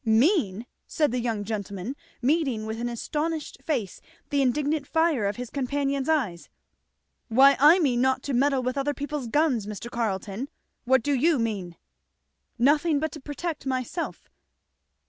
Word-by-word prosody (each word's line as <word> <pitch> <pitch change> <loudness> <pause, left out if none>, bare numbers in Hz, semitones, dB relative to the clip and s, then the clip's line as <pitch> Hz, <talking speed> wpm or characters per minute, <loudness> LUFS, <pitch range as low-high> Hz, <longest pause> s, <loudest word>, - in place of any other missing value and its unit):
"Mean?" 230 - +2 0.2
said 300 -4 +1
the 250 - -1
young 225 -3 -2
gentleman, 205 +2 -4 0.3
meeting 265 -6 +1
with 220 +1 -4
an 240 +1 -2
astonished 300 +6 -3
face 240 - -3 0.3
the 285 -1 +2
indignant 285 +2 0
fire 320 -9 +2
of 200 - -2
his 245 0 -7
companion's 280 +1 -1
eyes, 230 - 0 0.8
"why 270 +4 +6
I 300 +6 +8
mean 260 -9 +2
not 260 0 +1
to 280 - -3
meddle 270 +1 +2
with 255 +2 -1
other 290 +1 -1
people's 285 -2 -4
guns, 255 -5 +1
Mr. 215 +3 -6
Carleton. 220 +2 -3 0.4
What 260 -1 +3
do 290 - +1
you 300 +4 +3
mean?" 200 -7 -2 0.8
"Nothing 295 +5 +3
but 315 +1 -2
to 310 - -8
protect 295 +1 -5
myself." 260 +6 -3
265 Hz, 150 wpm, -26 LUFS, 230-295 Hz, 0.8 s, I